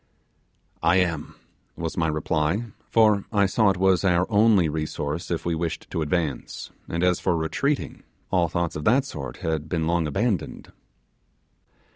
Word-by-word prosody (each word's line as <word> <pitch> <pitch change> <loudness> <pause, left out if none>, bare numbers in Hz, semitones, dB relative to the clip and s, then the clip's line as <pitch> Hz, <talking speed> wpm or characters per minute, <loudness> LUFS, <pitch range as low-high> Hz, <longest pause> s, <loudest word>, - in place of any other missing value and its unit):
'I 85 - +4
am,' 85 -5 0 0.4
was 80 -1 -4
my 80 -2 +1
reply; 75 +5 0 0.3
for 105 -3 +4
I 100 -3 +3
saw 105 +2 +3
it 95 - 0
was 95 0 +3
our 90 -1 +3
only 105 -4 +5
resource 75 +1 -3
if 85 - -2
we 85 - 0
wished 80 0 -4
to 80 - -2
advance, 75 -3 -2 0.2
and 85 +1 -1
as 90 -1 +3
for 85 - +1
retreating, 135 - -1 0.3
all 90 -3 +3
thoughts 85 0 -2
of 75 - -4
that 130 +5 +4
sort 70 - -7
had 80 -1 -2
been 80 -3 0
long 85 -1 +1
abandoned. 95 - -2
85 Hz, 155 wpm, -25 LUFS, 80-95 Hz, 0.4 s, only